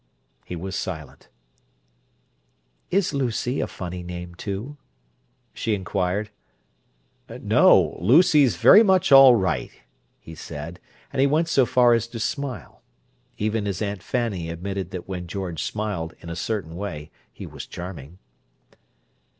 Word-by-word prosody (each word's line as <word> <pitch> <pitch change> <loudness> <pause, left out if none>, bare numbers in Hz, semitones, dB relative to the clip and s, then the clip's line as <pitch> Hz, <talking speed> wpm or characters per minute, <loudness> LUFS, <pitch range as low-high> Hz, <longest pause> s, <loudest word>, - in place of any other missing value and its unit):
He 90 - -7
was 95 +3 -5
silent. 80 -5 -6 1.6
"Is 190 -4 +1
'Lucy' 125 -1 -1
a - - -1
funny 90 0 -7
name, 90 0 -7
too?" 105 +10 -6 0.8
she 110 - -1
inquired. 95 +2 -2 1.0
"No. - - +3
Lucy's 145 - +5
very 210 - +7
much 190 -7 +3
all 135 -2 +9
right!" 95 -4 -1 0.5
he 80 - -12
said, 80 +1 -8 0.3
and - - -3
he 135 - +5
went 160 +4 +1
so 135 -6 +3
far 120 -1 +4
as 115 -1 +1
to 115 0 -8
smile. 140 +2 -4 0.6
Even 105 0 -1
his 95 -2 -3
Aunt 100 -3 -3
Fanny 100 -6 -2
admitted 95 +2 -4
that 90 -2 -7
when 90 -2 -5
George 90 -3 -4
smiled 100 -6 -4
"in 85 - -8
a - - -5
certain 90 -3 -4
way" 85 -6 -6 0.2
he - - -9
was - - -9
charming. 85 -3 -9
100 Hz, 135 wpm, -23 LUFS, 90-125 Hz, 1.6 s, all